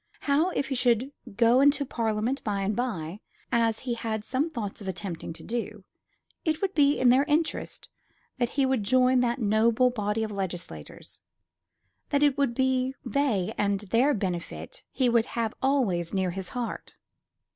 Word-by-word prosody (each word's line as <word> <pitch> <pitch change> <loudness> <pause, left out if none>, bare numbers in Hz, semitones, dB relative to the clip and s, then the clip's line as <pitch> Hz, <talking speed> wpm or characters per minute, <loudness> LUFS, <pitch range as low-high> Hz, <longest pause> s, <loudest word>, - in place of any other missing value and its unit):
How, 300 +5 +2
if 275 -6 -2
he - - -1
should 250 +1 +2 0.2
go 235 +3 +5
into 285 0 +4
Parliament 230 +2 -1
by 200 -2 -1
and 200 +2 -1
by, 200 -7 -3 0.3
as 230 -2 +2
he 250 -2 -2
had 225 -2 -3
some 270 +8 -1
thoughts 220 -9 -5
of 195 - -8
attempting 185 -3 -5
to 165 - -11
do, 220 -3 -4 0.6
it 315 -1 0
would 390 -1 -1
be 290 -1 +3
in 255 - +5
their 260 +3 +5
interests 310 +1 -1 0.5
that 240 -1 +1
he 275 - +4
would 260 -3 +1
join 255 +4 +3
that 240 0 +1
noble 230 +2 +3
body 210 -1 -1
of 215 - -3
legislators; 175 - -6 0.9
that 285 +1 +2
it 290 -2 +4
would 275 -4 0
be 260 0 +1
they 255 -11 0
and 200 -1 +1
their 235 +8 +2
benefit 190 - -5
he 260 - +1
would 235 -1 +3
have 225 -2 0
always 210 -12 +1
nearest 185 -2 0
his 190 -2 -5
heart. 245 -2 -5
235 Hz, 165 wpm, -27 LUFS, 205-265 Hz, 0.9 s, go